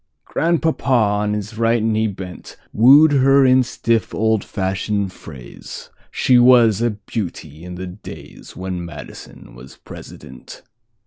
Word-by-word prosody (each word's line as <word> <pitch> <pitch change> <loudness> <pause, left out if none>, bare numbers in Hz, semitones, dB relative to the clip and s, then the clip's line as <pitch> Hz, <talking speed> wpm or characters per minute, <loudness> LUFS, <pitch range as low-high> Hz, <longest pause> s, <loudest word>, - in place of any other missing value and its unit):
Grandpapa, 165 -1 -1
on 105 -4 +1
his 105 +2 -6
right 115 -1 +1
knee 110 0 0
bent, 95 -3 -9 0.2
Wooed 140 +7 +6
her 135 0 +4
in 130 0 +5
stiff, 115 -3 -2
old 110 -2 0
fashioned 100 0 -3
phrase—She 80 - -3
was 120 -4 +5
a 120 - +2
beauty 95 -7 -7
in 90 0 -8
the 95 +1 -6
daysWhen 95 0 -9
Madison 85 -6 -11
was - - -14
President. - - -13
110 Hz, 120 wpm, -19 LUFS, 95-120 Hz, 0.2 s, Wooed